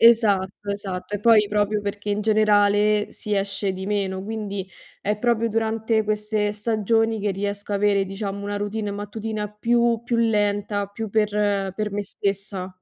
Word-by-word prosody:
Esatto, 205 -4 +4
esatto. 200 0 -4
E - - -8
poi 215 -1 +5
proprio 210 0 +1
perché, 205 0 -4
in 205 +1 0
generale, 210 -1 +3
si 210 -2 -3
esce 200 0 0
di 190 0 -6
meno, 195 -2 -1
quindi 205 -2 -4 0.4
è 210 +1 -1
proprio 230 -1 +2
durante 220 0 0
queste 210 0 0
stagioni 225 +1 +1
che 205 -1 0
riesco 200 +1 -4
a - - +1
avere, 200 -1 +3
diciamo, 200 +1 -5
una 205 0 -2
routine 205 0 -2
mattutina 210 +1 -4
più 235 +2 +1
più 245 - -1
lenta, 205 -2 +1
più 205 +1 -6
per 205 -2 +1
per 210 +1 -2
me 205 +1 -2
stessa. 195 -1 -3
210 Hz, 160 wpm, -23 LUFS, 200-215 Hz, 0.4 s, poi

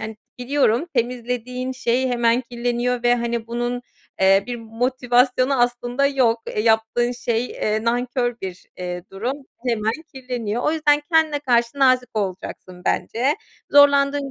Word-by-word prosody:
yani, 220 0 -6 0.2
biliyorum, 255 +2 +1
temizlediğin 250 +1 -2
şey 255 0 0
hemen 240 0 +2
kirleniyor 240 0 -2
ve, 240 0 +4
hani, 235 -1 -2
bunun, 240 +1 -3 0.4
eee, 195 +1 +5
bir 245 - -4
motivasyonu 250 +3 +1
aslında 245 +2 +1
yok. 250 -5 +2
E, 210 - -2
yaptığın 225 +2 +2
şey, 240 0 -1
eee, 215 +1 -2
nankör 245 0 0
bir, 185 -1 -7
eee, 180 -1 -5
durum. 215 +7 -3 0.3
Hemen 220 -2 +1 0.2
kirleniyor. 245 -3 -3
O 305 - +2
yüzden 295 -2 +3
kendine 315 -2 +3
karşı 240 -1 +1
nazik 255 -2 +4
olacaksın 185 -2 -5
bence. 260 +6 +1 0.4
Zorlandığın 280 -1 +4
245 Hz, 135 wpm, -22 LUFS, 230-255 Hz, 0.4 s, eee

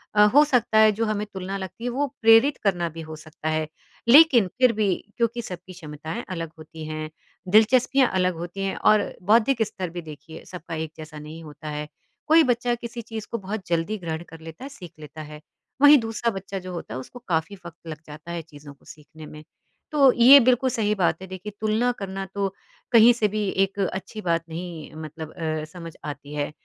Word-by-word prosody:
अ, 210 0 +7
हो 295 +1 +8
सकता 240 -5 +1
है 215 0 +7
जो 225 +2 -1
हमें 210 -1 -1
तुलना 190 +1 -4
लगती 190 +4 -8
है 245 - -1
वो 280 +4 -1
प्रेरित 225 +5 +6
करना 175 -4 +1
भी 165 +1 -9
हो 155 0 -8
सकता 155 0 -7
है। 155 0 -1 0.4
लेकिन 255 - +7
फिर 255 -2 +5
भी, 205 -4 +1 0.2
क्योंकि 235 0 0
सबकी 185 -2 -9
क्षमताएँ 155 +5 -7
अलग 165 -3 -5
होती 155 0 -10
हैं, 155 0 -5 0.4
दिलचस्पियाँ 245 +5 +4
अलग 180 -1 +1
होती 175 +4 -6
हैं 195 - -2
और 215 -1 +4 0.2
बौद्धिक 230 +4 +3
स्तर 185 -4 -5
भी 175 +1 -6
देखिए 160 +1 -11
सबका 170 -2 -8
एक 160 -1 -4
जैसा 155 -1 -9
नहीं 155 +2 -10
होता 150 0 -9
है। 150 0 -4 0.4
कोई 320 +1 +6
बच्चा 245 -1 +1
किसी 235 0 -7
चीज़ 220 -1 -7
को 235 - -1
बहुत 200 0 -6
जल्दी 170 +5 -1
ग्रहण 165 -2 -5
कर 165 0 -12
लेता 165 +9 -10
है, 275 - -6
सीख 180 - -11
लेता 155 +1 -10
है, 150 0 -10 0.4
वहीं 290 0 +9
दूसरा 225 +1 -2
बच्चा 195 0 -6
जो 185 0 -8
होता 165 -9 -7
है, 130 - -4
उसको 245 - -10
काफ़ी 165 +5 -1
वक़्त 170 0 -10
लग 155 -1 -6
जाता 155 +3 -10
है 170 -1 -3
चीज़ों 145 -2 -13
को 140 - -28
सीखने 155 +1 -13
में। 155 0 -11 0.5
तो 275 -4 +6
ये 255 +4 +8
बिल्कुल 255 +1 +3
सही 215 -3 0
बात 185 0 0
है 190 - -8
देखिए, 190 +3 -7
तुलना 220 +3 +1
करना 195 0 -5
तो 195 -1 -1 0.4
कहीं 230 0 +8
से 220 -3 +1
भी 210 0 -2 0.2
एक 195 +1 -12
अच्छी 195 +3 -3
बात 165 -3 0
नहीं 165 -1 -7
मतलब 155 0 -8
अ, 155 -1 -3
समझ 165 -1 -10
आती 145 0 -7
है। 145 0 -2
185 Hz, 205 wpm, -24 LUFS, 160-225 Hz, 0.5 s, वहीं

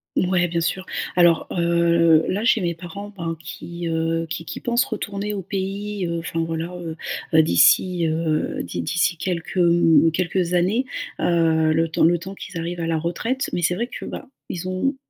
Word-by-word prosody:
Mouais, 180 -1 +2
bien 170 0 -1
sûr. 185 +3 -1 0.3
Alors, 175 -2 +4
heu, 170 -2 +3
là, 205 +4 -1
j'ai 230 -2 +3
mes 170 -2 -1
parents, 200 +5 -8
ben, 165 -1 -3
qui, 170 +2 -6
heu, 165 0 -1
qui 165 0 -4
qui - - -6
pensent 240 +2 +1
retourner 210 -3 -4
au 195 - -3
pays, 195 +1 -3
heu, 170 0 -2
enfin, 165 0 -4
voilà, 165 0 -2
heu 165 -2 -6 0.4
heu, 160 - +7
d'ici, 170 - +4
heu, 155 -1 -1
d'i - - -4
d'ici, 170 +2 +1
quelques, 175 +1 -3
mmh 170 -2 +5
mmh, - - +3
quelques 180 +1 -1
années, 195 +9 +2 0.3
heu, 160 -2 +2
le 165 +1 +2
temps 160 - +1
le 170 +1 +4
temps 190 +2 -8
qu'ils 185 -3 -7
arrivent 170 +1 -4
à - - -1
la 165 -1 0
retraite, 225 - -2
mais 175 - -1
c'est 175 - +3
vrai 235 +4 -2
que, - - -8
bah, - - -7 0.2
ils 180 +1 -4
ont 265 +10 0
170 Hz, 195 wpm, -22 LUFS, 165-190 Hz, 0.4 s, heu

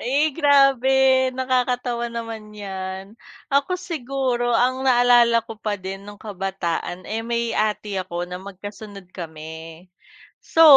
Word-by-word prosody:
Eh, 285 +3 +1
grabe 275 -4 +5 0.4
nakakatawa 250 -2 0
naman 225 -2 -6
'yan. 190 0 -6 0.4
Ako 285 +7 +2
siguro 265 -7 -1
ang 255 +3 +2
naalala 240 -2 +5
ko 225 - -7
pa 210 -2 -2
din 190 +1 -6
noong 205 0 -11
kabataan, 190 -3 -3
eh, 225 +1 -2
may 235 0 -1
ate 210 -1 0
ako 175 -1 -4
na 180 - -6
magkasunod 200 0 -9
kami. 160 0 -8 0.6
So, 325 - +3
225 Hz, 125 wpm, -23 LUFS, 195-255 Hz, 0.6 s, grabe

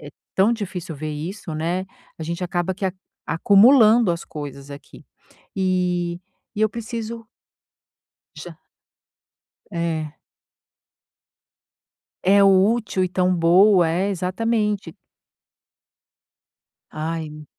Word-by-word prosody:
é 145 -1 -10 0.2
tão 200 +5 +3
difícil 180 -6 -5
ver 155 +1 -5
isso, 165 +4 -6
né. 170 +4 -2 0.3
A - - -6
gente 170 +3 -4
acaba 175 +1 -2
que 195 - -6
a 185 - -2 0.3
acumulando 215 - +5
as 170 - -5
coisas 145 -2 -8
aqui. 140 0 -12 0.5
E 180 -2 -1 0.3
e 210 - -4
eu 215 - +4
preciso 230 +1 -6 1.1
Já. - - -10 1.1
É. 160 -3 -3 2.1
É 200 +2 +5
útil 195 +1 +3
e 185 - -1
tão 185 0 +1
boa. 180 +2 +5
É, 185 +5 0
exatamente. 205 0 -2 2.0
Ai. 155 -1 -5
180 Hz, 100 wpm, -22 LUFS, 165-205 Hz, 2.1 s, acumulando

